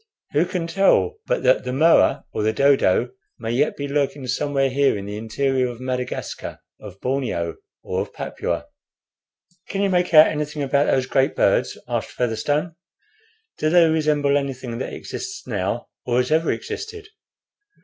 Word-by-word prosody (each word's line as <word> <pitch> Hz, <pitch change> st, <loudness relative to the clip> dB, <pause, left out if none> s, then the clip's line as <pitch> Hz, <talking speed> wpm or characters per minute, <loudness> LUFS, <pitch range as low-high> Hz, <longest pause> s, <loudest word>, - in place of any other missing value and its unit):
Who 160 Hz, +4 st, +3 dB
can 175 Hz, -2 st, -2 dB
tell 195 Hz, -, +2 dB
but -, -, 0 dB
that -, -, +4 dB
the 125 Hz, -, -3 dB
moa 155 Hz, +6 st, +4 dB
or -, -, -2 dB
the 110 Hz, +1 st, +2 dB
dodo 125 Hz, -3 st, +3 dB, 0.3 s
may 115 Hz, -1 st, -4 dB
yet 135 Hz, +5 st, +1 dB
be 140 Hz, -, -3 dB
lurking 140 Hz, -1 st, -1 dB
somewhere 135 Hz, +2 st, 0 dB
here 135 Hz, -3 st, +2 dB
in 100 Hz, -, -6 dB
the 105 Hz, 0 st, -5 dB
interior 130 Hz, +4 st, 0 dB
of 120 Hz, -1 st, -7 dB
Madagascar, 125 Hz, -1 st, -4 dB, 0.2 s
of 100 Hz, -2 st, -11 dB
Borneo, 125 Hz, -11 st, -2 dB, 0.3 s
or -, -, -2 dB
of -, -, -6 dB
Papua?" -, -, -4 dB, 1.0 s
"Can 195 Hz, 0 st, -1 dB
you 195 Hz, -, +1 dB
make 180 Hz, -1 st, +1 dB
out 155 Hz, -1 st, +9 dB
anything 150 Hz, -1 st, -2 dB
about 140 Hz, +1 st, +2 dB
those 130 Hz, -1 st, +2 dB
great 135 Hz, 0 st, +1 dB
birds?" -, -, +2 dB
asked -, -, -2 dB
Featherstone. 145 Hz, +8 st, -1 dB, 0.9 s
"Do 155 Hz, -, +1 dB
they 170 Hz, 0 st, +6 dB
resemble 150 Hz, -3 st, +2 dB
anything 130 Hz, -4 st, -5 dB
that -, -, -4 dB
exists 390 Hz, +1 st, -7 dB
now, -, -, -3 dB
or 120 Hz, 0 st, 0 dB
has 125 Hz, +3 st, +1 dB
ever 160 Hz, +1 st, +3 dB
existed?" 430 Hz, -1 st, -6 dB
140 Hz, 160 wpm, -22 LUFS, 125-155 Hz, 1.0 s, out